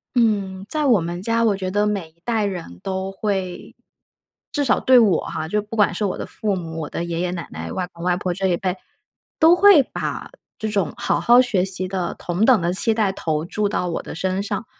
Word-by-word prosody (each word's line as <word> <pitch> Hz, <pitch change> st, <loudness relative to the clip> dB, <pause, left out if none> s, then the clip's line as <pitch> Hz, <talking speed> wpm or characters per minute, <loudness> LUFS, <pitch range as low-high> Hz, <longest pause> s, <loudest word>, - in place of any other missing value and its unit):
嗯， 200 Hz, -5 st, 0 dB
在 305 Hz, -1 st, -1 dB
我 240 Hz, -7 st, +4 dB
们 175 Hz, +1 st, -5 dB
家， 230 Hz, +3 st, +1 dB
我 215 Hz, -3 st, +2 dB
觉 190 Hz, -1 st, -4 dB
得 205 Hz, +2 st, +1 dB
每 200 Hz, -6 st, -2 dB
一 160 Hz, +1 st, -35 dB
代 225 Hz, -3 st, 0 dB
人 175 Hz, -, -6 dB
都 190 Hz, 0 st, -3 dB
会 190 Hz, -2 st, -4 dB, 0.8 s
至 290 Hz, -, 0 dB
少 265 Hz, -, +2 dB
对 260 Hz, -1 st, +5 dB
我 210 Hz, -6 st, +3 dB
哈， 155 Hz, 0 st, -5 dB
就 210 Hz, +5 st, 0 dB
不 210 Hz, +2 st, -9 dB
管 210 Hz, -2 st, +3 dB
是 205 Hz, +4 st, -2 dB
我 190 Hz, -, -2 dB
的 -, -, -5 dB
父 210 Hz, -2 st, -2 dB
母、 165 Hz, -3 st, -6 dB
我 150 Hz, -, -5 dB
的 -, -, -4 dB
爷 170 Hz, -1 st, -4 dB
爷 180 Hz, 0 st, -1 dB
奶 170 Hz, -2 st, -6 dB
奶、 -, -, -7 dB
外 180 Hz, -1 st, -3 dB
公 170 Hz, -, -11 dB
外 180 Hz, 0 st, +1 dB
婆 180 Hz, -2 st, -2 dB
这 190 Hz, +2 st, -1 dB
一 175 Hz, -2 st, +1 dB
辈， 185 Hz, 0 st, -2 dB, 0.6 s
都 330 Hz, +2 st, +6 dB
会 370 Hz, -5 st, +6 dB
把 -, -, -5 dB, 0.3 s
这 220 Hz, -, -3 dB
种 200 Hz, -6 st, -1 dB
好 -, -, 0 dB
好 240 Hz, +1 st, +6 dB
学 225 Hz, -8 st, +1 dB
习 185 Hz, -1 st, +1 dB
的 185 Hz, -2 st, -3 dB
同 180 Hz, +5 st, -1 dB
等 245 Hz, -6 st, +4 dB
的 170 Hz, +1 st, 0 dB
期 220 Hz, +4 st, +8 dB
待 215 Hz, -3 st, +1 dB
投 160 Hz, -4 st, -3 dB
注 205 Hz, +3 st, -1 dB
到 180 Hz, -3 st, -2 dB
我 165 Hz, -, -3 dB
的 -, -, -9 dB
身 185 Hz, +3 st, -1 dB
上。 205 Hz, +3 st, -4 dB
195 Hz, 250 characters per minute, -21 LUFS, 180-215 Hz, 0.8 s, 期